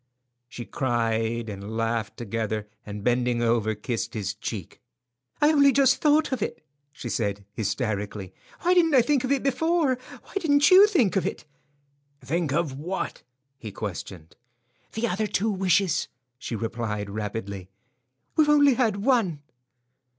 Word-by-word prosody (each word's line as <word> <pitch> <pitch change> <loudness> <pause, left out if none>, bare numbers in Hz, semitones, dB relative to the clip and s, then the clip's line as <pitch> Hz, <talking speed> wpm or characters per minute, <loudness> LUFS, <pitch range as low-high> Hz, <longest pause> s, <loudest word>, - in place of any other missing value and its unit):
She 120 -1 -7
cried 115 -2 -1
and 105 +1 -6
laughed 115 -1 -2
together, 110 -1 -3 0.2
and 105 0 -6
bending 120 0 +1
over, 115 -2 +1
kissed 115 +2 -4
his 100 -2 -2
cheek. 105 -3 -7 0.6
"I 295 +1 +5
only 280 -2 +5
just 270 -1 +4
thought 305 0 +3
of 260 -4 -2
it," 155 - -4 0.3
she 125 - -8
said, 100 -4 -2
hysterically. 105 -2 -3 0.3
"Why 355 +1 +3
didn't 330 -4 +4
I 250 - +6
think 275 0 +1
of 260 - -1
it 280 - +1
before? 280 0 +1 0.2
Why - - -17
didn't 290 -1 +4
you 385 +3 +9
think 270 - +2
of 190 - +1
it?" - - -5 0.7
"Think 155 +3 -2
of 145 -3 -1
what?" 180 +5 -4 0.4
he 110 -4 -7
questioned. 90 -5 -7 0.6
"The 230 +2 -1
other 210 +2 -1
two 210 +2 0
wishes," 190 -2 +1 0.3
she 120 - -5
replied, 110 -2 -3
rapidly. 100 -2 -5 0.7
"We've 305 -1 +4
only 290 -2 +6
had 220 -5 0
one." 200 - +2
125 Hz, 145 wpm, -25 LUFS, -, 0.7 s, you